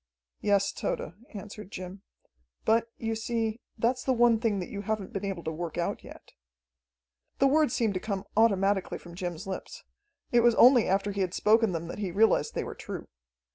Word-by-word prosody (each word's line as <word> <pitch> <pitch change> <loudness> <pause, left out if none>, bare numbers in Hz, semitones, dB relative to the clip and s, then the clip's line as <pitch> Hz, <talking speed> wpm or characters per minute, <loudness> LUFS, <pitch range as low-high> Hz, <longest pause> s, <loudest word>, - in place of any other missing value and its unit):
"Yes, 200 -1 +2
Tode," 160 - -3 0.2
answered 210 0 -8
Jim, 185 +1 -7 0.6
"but, 230 +1 +3
you 225 -1 -2
see, 225 0 -2 0.2
that's 245 +3 +1
the 265 - +2
one 235 -1 +4
thing 220 -3 +1
that 180 - -4
you 200 - -5
haven't 215 +1 -3
been 195 -1 -3
able 195 -4 -3
to 160 - -2
work 165 +1 -5
out 170 - -2
yet." - - -13 1.1
The 275 - +3
words 295 -1 +3
seemed 225 -4 +1
to 185 - -2
come 200 -1 -4
automatically 200 -3 +2
from 175 - -13
Jim's 175 +1 -5
lips. 190 -1 -6 0.5
It 240 - +5
was 235 -1 +5
only 245 -1 +7
after 195 +2 +1
he 200 0 -2
had 185 -1 -1
spoken 220 0 +4
them 165 -1 -4
that 170 - -7
he 200 -3 -2
realized 215 +6 +2
they - - -1
were - - -6
true. - - -7
205 Hz, 190 wpm, -28 LUFS, 190-230 Hz, 1.1 s, only